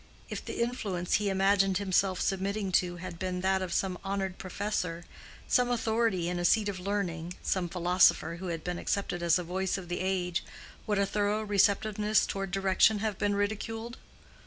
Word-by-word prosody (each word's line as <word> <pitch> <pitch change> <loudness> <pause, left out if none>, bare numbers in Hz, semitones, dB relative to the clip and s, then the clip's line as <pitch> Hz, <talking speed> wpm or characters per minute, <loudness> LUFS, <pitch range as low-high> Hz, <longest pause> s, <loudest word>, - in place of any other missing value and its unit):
If - - -4
the - - -2
influence 200 -8 -3
he 205 - +1
imagined 195 0 +3
himself 190 -1 +1
submitting 195 +1 -1
to 180 -1 +2
had 175 -1 -8
been 180 -1 -2
that 190 0 +2
of 185 -2 -3
some 185 -2 -1
honored 195 -1 -3
professor, 185 -3 -3 0.4
some 250 -1 +3
authority 225 -6 +1
in 175 0 -2
a - - -2
seat 210 +4 +3
of 190 -2 -4
learning, 180 -3 -3
some 180 -2 0
philosopher 180 -1 +3
who 185 +2 -6
had 165 -2 -4
been 180 0 -3
accepted 195 -3 -2
as 170 +1 +4
a 180 - -3
voice 185 +3 -1
of 180 -2 -8
the 175 - -2
age, 185 -2 -1 0.4
would 210 -1 +1
a 200 - +3
thorough 210 +1 0
receptiveness 210 +1 +2
toward 195 -1 -3
direction 195 +3 +3
have 210 -1 -2
been 205 0 +1
ridiculed? 225 +3 -3
190 Hz, 180 wpm, -30 LUFS, 180-205 Hz, 0.4 s, as